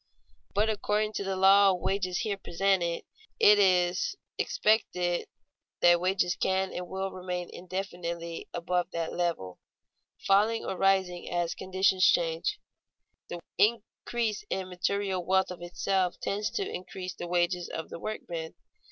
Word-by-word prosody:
But 210 +2 +3
according 215 0 0
to 200 - -2
the 195 0 -2
law 195 +1 +6
of 185 -2 +1
wages 185 -2 -1
here 215 -4 -1
presented, 180 -2 0 0.4
it 210 0 +7
is 180 -2 +3
to - - -24 0.2
be - - +3
expected 180 - +1 0.5
that 175 0 +6
wages 180 -1 +1
can 190 0 0
and 180 0 -5
will 190 +1 -3
remain 180 -1 -5
indefinitely 175 -2 -5
above 180 +1 -1
that 165 -1 -2
level, 165 - -2 0.7
falling 210 +4 +3
or 190 - -3
rising 190 -2 +1
as 175 -1 -1
conditions 190 0 +1
change. 165 - +1 0.7
The 175 - -6 0.2
increase 225 - 0
in 190 -1 -3
material 190 +1 -1
wealth 190 +1 +2
of 180 - -8
itself 180 +1 -1
tends 205 +2 -1
to 400 -2 -1
increase 185 - -6
the 175 - -7
wages 175 0 0
of 160 - -5
the - - -7
workman. 170 -6 -5
185 Hz, 145 wpm, -29 LUFS, 175-195 Hz, 0.7 s, it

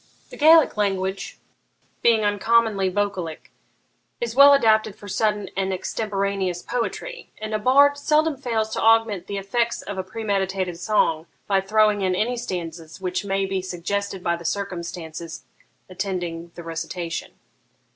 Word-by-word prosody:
The - - -8
Gaelic 315 -4 +6
language, 195 -1 -1 0.6
being 225 -2 +4
uncommonly 205 -1 +2
vocalic, 185 -4 -3 0.7
is 235 -1 -3
well 280 +1 +9
adapted 220 -6 +3
for 205 - -12
sudden 210 0 -1
and 195 0 -1
extemporaneous 195 -1 -2
poetry; 475 - -4
and 215 0 -5
a 215 - 0
bard 280 +5 +5
seldom 305 +1 +2
fails 225 -4 -2
to - - -2
augment 225 -5 +3
the 200 - -4
effects 230 +4 -1
of 200 -2 -5
a - - -1
premeditated 190 -3 -2
song 170 -5 +1 0.2
by 195 -1 +2
throwing 210 +1 +3
in 185 -1 +1
any 235 +6 0
stanzas 165 -6 -6
which 185 +1 -2
may 195 0 0
be 190 -1 -2
suggested 190 +2 -3
by 170 - +1
the 170 - -10
circumstances 170 -3 -5 0.4
attending 180 -3 -4
the 175 - -8
recitation.' 165 +1 -5
195 Hz, 140 wpm, -23 LUFS, 180-220 Hz, 0.7 s, well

